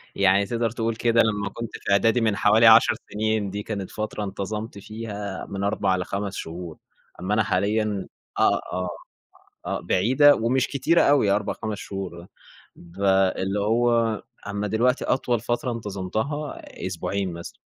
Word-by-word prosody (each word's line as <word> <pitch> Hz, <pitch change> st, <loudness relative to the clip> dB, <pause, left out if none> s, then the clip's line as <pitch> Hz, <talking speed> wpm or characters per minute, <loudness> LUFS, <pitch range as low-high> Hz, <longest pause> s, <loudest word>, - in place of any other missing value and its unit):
يعني 100 Hz, +1 st, +4 dB
تقدر 115 Hz, +1 st, -1 dB
تقول 115 Hz, -1 st, -2 dB
كده 115 Hz, 0 st, +3 dB
لمّا 105 Hz, -2 st, 0 dB
كنت 115 Hz, +3 st, -6 dB
في -, -, -4 dB
إعدادي 115 Hz, +4 st, +3 dB
من 110 Hz, -3 st, +2 dB
حوالي 110 Hz, +3 st, +5 dB
10 110 Hz, +1 st, +7 dB, 0.2 s
سنين، 110 Hz, -1 st, 0 dB
دي 100 Hz, +1 st, -5 dB
كانت 100 Hz, -4 st, -5 dB
فترة 105 Hz, -1 st, -4 dB
انتظمت 105 Hz, +2 st, -5 dB
فيها 105 Hz, -2 st, -6 dB
من 100 Hz, 0 st, -4 dB
4 100 Hz, -2 st, +1 dB
ل5 100 Hz, +2 st, -3 dB
شهور. 85 Hz, 0 st, -7 dB, 0.4 s
أمّا 95 Hz, +3 st, -2 dB
أنا 110 Hz, 0 st, +3 dB
حاليًا 105 Hz, +1 st, 0 dB, 0.3 s
آه، -, -, +4 dB
آه، 90 Hz, 0 st, -2 dB, 0.8 s
آه -, -, -2 dB
بعيدة 130 Hz, +10 st, +4 dB
ومش 125 Hz, +3 st, +1 dB
كتيرة 165 Hz, +5 st, +2 dB
أوي 140 Hz, -8 st, +4 dB
4، 100 Hz, +1 st, +1 dB
5 110 Hz, -2 st, -5 dB
شهور، 95 Hz, -3 st, -6 dB
آه. 90 Hz, -, -15 dB, 0.5 s
ب 85 Hz, +3 st, -11 dB, 0.3 s
اللي 95 Hz, +2 st, -1 dB
هو 115 Hz, 0 st, +2 dB, 0.2 s
أمّا 100 Hz, +1 st, -3 dB
دلوقتي 120 Hz, +5 st, +1 dB
أطول 120 Hz, -3 st, 0 dB
فترة 120 Hz, +2 st, -2 dB
انتظمتها 110 Hz, +7 st, -4 dB, 0.2 s
أسبوعين 95 Hz, +1 st, -2 dB
مثلًا. 85 Hz, 0 st, -9 dB
105 Hz, 150 wpm, -24 LUFS, 100-115 Hz, 0.8 s, 10